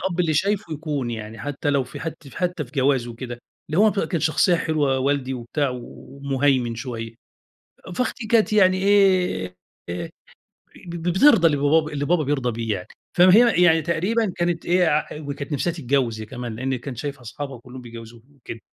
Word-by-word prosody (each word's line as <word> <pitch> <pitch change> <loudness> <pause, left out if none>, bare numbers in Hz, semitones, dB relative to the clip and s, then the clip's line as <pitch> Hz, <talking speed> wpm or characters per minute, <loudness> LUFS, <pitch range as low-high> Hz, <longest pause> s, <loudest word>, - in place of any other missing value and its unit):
الأب 180 -2 -1
اللي 160 -3 +1
شايفُه 195 0 0
يكون 145 -5 -3
يعني، 110 0 -7
حتّى 145 +5 -2
لو 140 -2 +1
في - - -10
حت 160 -2 -7
حتّى 180 -3 -2
في 125 - -18
جواز 135 -2 +2
وكده، 120 +1 -7 0.3
اللي 155 - 0
هو 215 +1 +6
كان 185 -4 -1
شخصيّة 160 +3 +3
حلوة 150 -5 0
والدي 135 -1 0
وبتاع 130 +4 -2
ومُهيمن 135 -1 -2
شوية، 115 -1 -6 0.8
فأختي 250 -2 -2
كانت 220 -1 +3
يعني 185 -3 +4 1.1
آآ، 90 - -5 0.8
ب 170 0 -6
بترضى 190 - +5
اللي 145 - +1
با 155 +3 +3
اللي 145 0 -2
بابا 170 -1 +2
بيرضى 135 -3 0
بيه 115 -1 -2
يعني، 90 - -8 0.3
فهي 185 +2 +6
يعني 165 -2 +5
تقريبًا 185 +6 0
كانت 175 -1 -1
إيه، 170 -4 +2 0.2
وكانت 145 0 -6
نفسها 150 +4 0
تتجوّز 130 -7 0
هي - - -6
كمان، 120 -1 -6
لأني 130 +2 -2
كانت 125 0 -7
شايفة 140 0 -5
أصحابها 130 +2 -7
كلّهم 125 +1 -11
بيتجوّزوا 115 -1 -11 0.2
وكده، 115 -3 -9
145 Hz, 165 wpm, -23 LUFS, 125-170 Hz, 1.1 s, هو